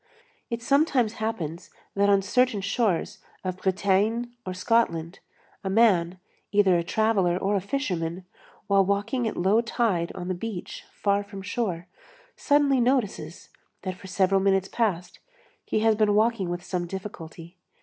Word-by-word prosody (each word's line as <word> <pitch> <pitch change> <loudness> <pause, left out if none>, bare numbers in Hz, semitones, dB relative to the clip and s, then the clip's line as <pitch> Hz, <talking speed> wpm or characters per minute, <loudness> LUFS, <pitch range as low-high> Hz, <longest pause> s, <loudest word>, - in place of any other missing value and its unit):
It 235 -1 -4
sometimes 270 -4 +2
happens, 175 -7 -4 0.3
that 200 0 +3
on 200 -1 +4
certain 250 0 +2
shores 205 0 0 0.2
of 185 -1 -3
Bretagne 200 +5 +1 0.2
or 185 - -2
Scotland 185 -5 0 0.4
a 190 - -2
man, 190 -5 +3 0.3
either 200 -3 +4
a 170 - +1
traveller 195 -3 +1
or 195 +2 0
a 195 - +1
fisherman, 180 - -3 0.4
while 195 0 +4
walking 210 +5 0
at - - -4
low 195 +6 +3
tide 225 -7 0
on 180 -2 -6
the 185 - -1
beach 185 0 -6
far 200 0 0
from 200 -1 -9
shore, 190 -4 -2 0.5
suddenly 285 -3 +3
notices 245 -4 -1 0.3
that 185 - -3
for 190 - -12
several 190 0 +2
minutes 195 0 +2
past, 185 -7 -2 0.5
he 215 - 0
has 225 0 +4
been 210 -1 +2
walking 215 -4 +2
with 175 0 -4
some 175 -1 -3
difficulty. 170 -3 -8
200 Hz, 150 wpm, -26 LUFS, 185-225 Hz, 0.5 s, on